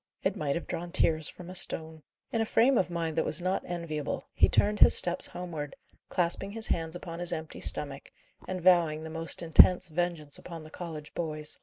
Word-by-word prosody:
It - - +1
might 140 -2 -1
have 170 - -4
drawn 170 +1 -5
tears 160 -3 +1
from 180 - -11
a 180 - -8
stone. 160 -3 -2 0.3
In 225 - 0
a - - +1
frame 255 +5 +4
of 185 - +2
mind 165 -2 -2
that - - +2
was - - -1
not 185 +2 -1
enviable, 165 -4 -4
he - - +4
turned 210 +1 +2
his - - +7
steps 175 0 +2
homeward, 165 -5 -6 0.3
clasping 180 +3 +1
his 225 0 0
hands 165 0 -1
upon 170 -1 -7
his 175 0 -2
empty 160 -1 -5
stomach, 140 -1 0 0.4
and 185 -2 -4
vowing 170 -4 +4
the 160 - -7
most 165 +1 -4
intense 180 +2 +6
vengeance 165 -3 -2
upon 165 -3 -9
the 155 - -13
college 160 -4 -8
boys. 155 -2 -1
170 Hz, 200 wpm, -29 LUFS, 155-180 Hz, 0.4 s, his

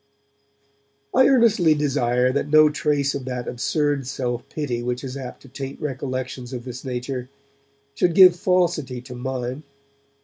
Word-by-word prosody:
I 260 0 +6
earnestly 225 - +4
desire 125 -4 +1
that 140 +1 -1
no 155 0 +6
trace 145 -2 0
of 135 -2 -5
that 125 -1 -4
absurd 145 +2 -1
self 120 -2 -3
pity 125 -6 -3
which 125 +1 -3
is 130 -1 -6
apt 130 -2 -8
to - - -14
taint 135 +1 -7
recollections 130 -2 -4
of 120 -1 -6
this 125 -1 -7
nature 125 0 -4 0.6
should 165 +4 +1
give 185 -2 +8
falsity 175 -8 0
to 125 +1 -10
mine. 125 +1 -4
135 Hz, 145 wpm, -23 LUFS, 125-150 Hz, 0.6 s, give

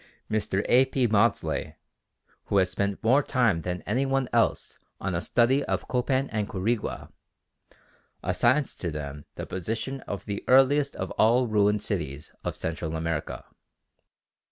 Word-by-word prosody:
Mr. 105 -2 0
A. 130 +2 +6
P. 130 -2 +1
Maudslay, 110 +1 +1 0.7
who 100 - 0
has 95 -1 +3
spent 100 +2 -2
more 130 +6 +5
time 120 -11 +1
than 90 +1 -4
any 120 +7 0
one 135 -1 0
else - - +1 0.2
on 95 -1 -2
a 85 - -1
study 125 +7 +2
of - - -2
Copan 130 +2 0
and 105 -1 -2
Quirigua, 105 +3 -2 1.1
assigns 130 +4 +2
to 85 - -4
them 75 -1 -6
the - - -5
position 115 +8 -4
of 100 -1 -5
the 100 -1 -4
earliest 135 +2 +4
of 95 - -4
all 120 +3 +4
ruined 105 -2 +2
cities 75 -8 -4
of - - -3
Central 80 0 -4
America. 80 -1 -3
105 Hz, 145 wpm, -27 LUFS, 90-130 Hz, 1.1 s, A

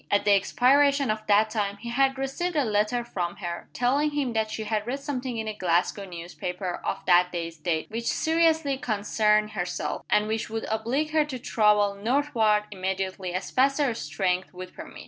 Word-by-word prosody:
At 205 - +2
the 205 - +4
expiration 275 +6 +3
of 215 0 -3
that 210 +1 +4
time 205 -2 -1
he 235 +3 -7
had 270 +2 +2
received 275 +6 -2
a 290 -3 +2
letter 215 +3 +1
from 180 -7 -3
her, 175 -3 -6
telling 275 +5 +1
him 285 -5 -2
that 220 -1 0
she 220 0 -4
had 215 0 -2
read 270 +3 -2
something 260 -4 -4
in 220 -1 -3
a 215 - -2
Glasgow 185 +1 0
newspaper, 180 +1 -5
of - - -3
that 180 0 +4
day's 165 -1 -4
date, 160 0 -1
which 230 +1 -4
seriously 320 -4 +2
concerned 215 -1 +1
herself, 175 -2 -3
and 210 - +3
which 220 +1 -2
would 225 0 -3
oblige 245 +8 -1
her 310 -1 +3
to 280 -4 -5
travel 210 -4 +2
northward 225 -1 +1
immediately 190 -1 -3
as 185 - -4
fast 275 +2 +2
as 290 - +3
her - - -1
strength 180 +3 -2
would 185 0 -8
permit. - - -10
215 Hz, 190 wpm, -26 LUFS, 190-265 Hz, -, the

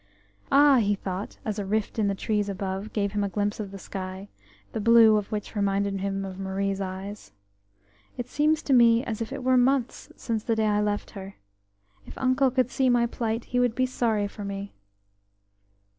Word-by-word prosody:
"Ah," 285 -1 +6
he 205 -2 +2
thought, 195 +1 -5
as 215 -1 -2
a - - -2
rift 215 +3 -2
in 210 - +2
the 200 - 0
trees 205 0 -1
above 195 +1 -4
gave 200 -2 -1
him 205 0 -1
a 200 - -1
glimpse 205 +2 -2
of 205 -2 -4
the 195 - -9
sky, 190 +1 -7 0.4
the - - -2
blue 225 0 +7
of 210 -1 -2
which 210 +1 -4
reminded 200 -1 0
him 195 0 -2
of 190 0 -8
Marie's 195 +1 -2
eyes, 190 - -6 0.8
"it 245 -1 -4
seems 300 +3 +1
to 275 - +1
me 235 -1 +5
as 225 -2 -4
if 225 - -4
it - - -5
were 255 0 +3
months 250 0 +1
since 225 -3 -3
the 230 - 0
day 220 0 +1
I 210 -1 +2
left 205 0 -2
her. 195 -1 -9 0.7
If - - -11
uncle 260 +1 +2
could 255 -1 0
see 265 -1 +2
my 240 -1 +3
plight, 230 -1 -3
he 250 - +3
would 245 -2 +2
be 255 - +2
sorry 225 -5 0
for 205 +1 -9
me." 200 0 -5
210 Hz, 200 wpm, -26 LUFS, 195-235 Hz, 0.8 s, blue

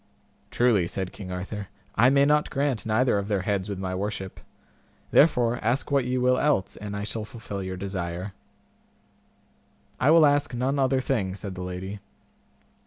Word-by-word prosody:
Truly, 115 -8 +2
said 95 0 -3
King 95 -3 -8
Arthur, 95 +2 -5 0.3
I 120 +4 +5
may 140 +1 +4
not 150 +1 +3
grant 135 -5 -1
neither 110 0 +2
of 100 - -4
their 100 -3 0
heads 100 0 -1
with 100 - -3
my 95 -1 -3
worship, 95 0 -4 0.7
therefore 125 -6 +4
ask 125 +6 0
what 140 -3 +2
ye 125 +1 -1
will 125 0 +3
else, 145 -10 +1
and 105 0 -6
I 100 - -3
shall 110 +1 -3
fulfil 110 -3 -7
your 95 0 -5
desire. 90 0 -4 1.7
I 135 - +3
will 160 -1 +7
ask 145 -3 +2
none 135 +4 0
other 135 0 +2
thing, 100 -9 -1
said 100 -1 -6
the 90 - -7
lady. 90 +3 -5
105 Hz, 170 wpm, -26 LUFS, 95-130 Hz, 1.7 s, will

